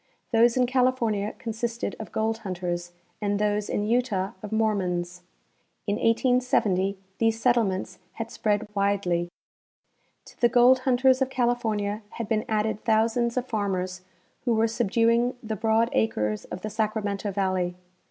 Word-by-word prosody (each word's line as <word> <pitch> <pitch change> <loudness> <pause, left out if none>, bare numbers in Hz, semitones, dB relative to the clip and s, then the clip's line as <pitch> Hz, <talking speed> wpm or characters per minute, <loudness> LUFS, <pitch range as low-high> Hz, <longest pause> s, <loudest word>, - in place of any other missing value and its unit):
Those 235 +1 +4
in 250 - +4
California 245 -5 +1
consisted 235 -1 -3
of 220 -4 -7
gold 220 +1 -1
hunters 175 -3 -4 0.3
and 205 -1 0
those 210 0 0
in 205 - -1
Utah 220 -5 0
of 210 - -7
Mormons. 180 -5 -1 0.6
In 205 -1 0
1870 230 -5 +2 0.2
these 225 0 +2
settlements 205 -7 +1
had 230 0 -6
spread 210 0 0
widely. 195 -4 0 1.0
To - - -17
the 240 - +5
gold 245 +2 +6
hunters 260 +1 +4
of 265 - +2
California 225 -5 0
had 230 - -4
been 215 -1 0
added 215 -1 0
thousands 230 +2 +1
of 250 - 0
farmers 185 -5 -2 0.4
who 240 -2 +2
were 225 +1 +3
subduing 230 +2 +2
the 220 -1 -3
broad 225 +2 +2
acres 105 -1 0
of 180 - -7
the 215 - -5
Sacramento 210 -2 -1
valley. 185 -2 -1
220 Hz, 140 wpm, -26 LUFS, 195-235 Hz, 1.0 s, gold